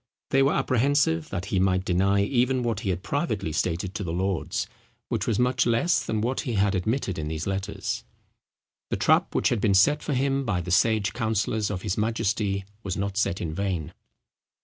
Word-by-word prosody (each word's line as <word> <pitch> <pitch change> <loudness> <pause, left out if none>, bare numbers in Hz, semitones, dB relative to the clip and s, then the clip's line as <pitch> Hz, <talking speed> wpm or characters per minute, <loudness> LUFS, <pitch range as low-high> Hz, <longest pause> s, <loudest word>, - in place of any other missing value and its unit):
They 135 - +4
were 135 +1 +3
apprehensive 130 - +2
that 95 -1 -4
he 95 - +3
might 95 0 +2
deny 100 +2 +2
even 125 +3 +1
what 115 -4 -1
he 110 -4 -3
had 90 0 -2
privately 110 - -1
stated 85 +4 -1
to 105 - -4
the 85 - -3
lords, 95 0 -1 0.4
which - - -1
was 110 - +1
much 125 0 +2
less 120 +10 +2
than 110 -1 -1
what 125 +4 -1
he 125 -6 -2
had 100 -1 +2
admitted 95 -1 -1
in 75 - -3
these 80 +1 -3
letters. 95 0 -3 0.9
The - - -1
trap - - +2
which - - +3
had 120 -4 0
been 100 -2 +3
set 145 +10 +4
for 145 - -2
him 135 +1 +1
by 105 -8 0
the 90 +1 -5
sage 105 0 +3
counsellors 110 -2 0
of 95 -3 -4
his 105 -1 -1
majesty 105 -3 0 0.2
was 95 -4 -3
not 100 0 -2
set 100 -3 0
in 80 -3 -3
vain. 90 -4 -2
100 Hz, 195 wpm, -26 LUFS, 95-120 Hz, 0.9 s, They